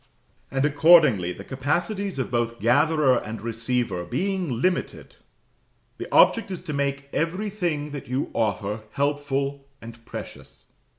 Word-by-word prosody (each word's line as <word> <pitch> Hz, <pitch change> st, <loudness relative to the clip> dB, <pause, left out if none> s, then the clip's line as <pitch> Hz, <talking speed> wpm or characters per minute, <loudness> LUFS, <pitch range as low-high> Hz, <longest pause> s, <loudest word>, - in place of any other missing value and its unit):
And 135 Hz, +1 st, 0 dB
accordingly, 145 Hz, -, +5 dB
the 100 Hz, -, -8 dB
capacities 175 Hz, -, -2 dB
of 130 Hz, -, -3 dB
both 115 Hz, -1 st, -1 dB
gatherer 140 Hz, +3 st, +3 dB
and 110 Hz, 0 st, -7 dB
receiver 115 Hz, -4 st, -2 dB
being 175 Hz, -, -2 dB
limited, 185 Hz, +6 st, -2 dB, 0.8 s
the -, -, -7 dB
object 230 Hz, -3 st, +5 dB
is 185 Hz, -3 st, -6 dB
to 150 Hz, -, -5 dB
make 140 Hz, 0 st, -2 dB
everything 175 Hz, -4 st, -2 dB
that 145 Hz, -2 st, -7 dB
you 130 Hz, +3 st, -2 dB
offer 105 Hz, -1 st, -1 dB
helpful 140 Hz, -1 st, -1 dB
and 115 Hz, 0 st, -12 dB
precious. -, -, -10 dB
140 Hz, 125 wpm, -24 LUFS, 115-160 Hz, 0.8 s, accordingly